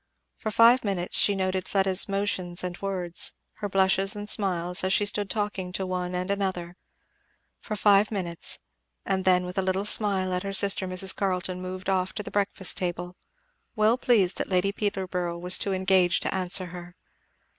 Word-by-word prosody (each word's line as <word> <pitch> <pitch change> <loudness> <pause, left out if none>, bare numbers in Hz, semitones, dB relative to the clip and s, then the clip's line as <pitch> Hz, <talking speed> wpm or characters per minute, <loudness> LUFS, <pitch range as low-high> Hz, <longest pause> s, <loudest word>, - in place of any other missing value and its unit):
For 220 - -3
five 230 +3 +5
minutes 190 -4 0
she 205 - +4
noted 185 -1 -2
Fleda's 190 -1 +1
motions 190 -3 -1
and 180 -1 -4
words, 185 -3 0 0.2
her 205 - -4
blushes 195 +1 +2
and 205 0 -6
smiles, 180 -4 +1
as 185 - 0
she 205 - +2
stood 205 -1 0
talking 200 -4 -3
to 190 +1 -2
one 180 -1 -3
and 180 +2 -2
another; 185 -3 -3 0.8
for 215 - -5
five 205 0 +4
minutes, 175 -5 -2 0.5
and 190 -1 -1
then 180 -1 +3
with 180 +1 -4
a - - +2
little 190 +1 -1
smile 195 -3 +1
at 180 - -1
her 195 0 -5
sister 195 -1 +2
Mrs. 185 +1 -2
Carleton 185 -2 -2
moved 185 0 -7
off 190 -1 0
to 210 - -5
the - - -9
breakfast 200 -2 0
table, 175 0 -4 0.6
well 215 +1 +3
pleased 215 -8 +1
that - - -3
Lady 185 +1 +1
Peterborough 185 -4 -3
was 180 +1 +2
too 200 - -2
engaged 185 -2 +2
to - - -2
answer 185 0 +2
her. 175 0 -10
190 Hz, 175 wpm, -26 LUFS, 180-200 Hz, 0.8 s, five